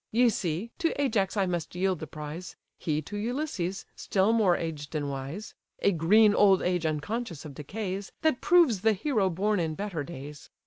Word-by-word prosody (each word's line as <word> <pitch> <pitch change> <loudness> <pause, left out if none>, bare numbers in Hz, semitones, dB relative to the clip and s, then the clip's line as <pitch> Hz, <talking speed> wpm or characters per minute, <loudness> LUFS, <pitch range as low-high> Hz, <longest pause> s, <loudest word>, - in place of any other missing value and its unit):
Ye 240 +2 +5
see, 185 +2 -2
to 330 -5 0
Ajax 215 -8 +1
I 195 - +3
must 175 -2 -3
yield 185 -1 0
the 160 - -6
prize: 155 +4 -7 0.2
He 155 -1 -1
to 205 - -8
Ulysses, 210 - -2
still 195 +3 +1
more 200 -6 +4
aged 155 -2 -5
and 145 -2 -1
wise; 140 +10 -6 0.3
(A 200 - +5
green 205 +6 +5
old 195 -2 +5
age 180 -2 +1
unconscious 165 - -3
of 150 - -8
decays, 190 +6 -5
That 315 -6 +2
proves 340 - +4
the 220 +1 +4
hero 210 -2 +1
born 200 +4 0
in 160 -2 -1
better 195 -6 -3
days!) 145 -2 -9
190 Hz, 180 wpm, -28 LUFS, 160-215 Hz, 0.3 s, Ye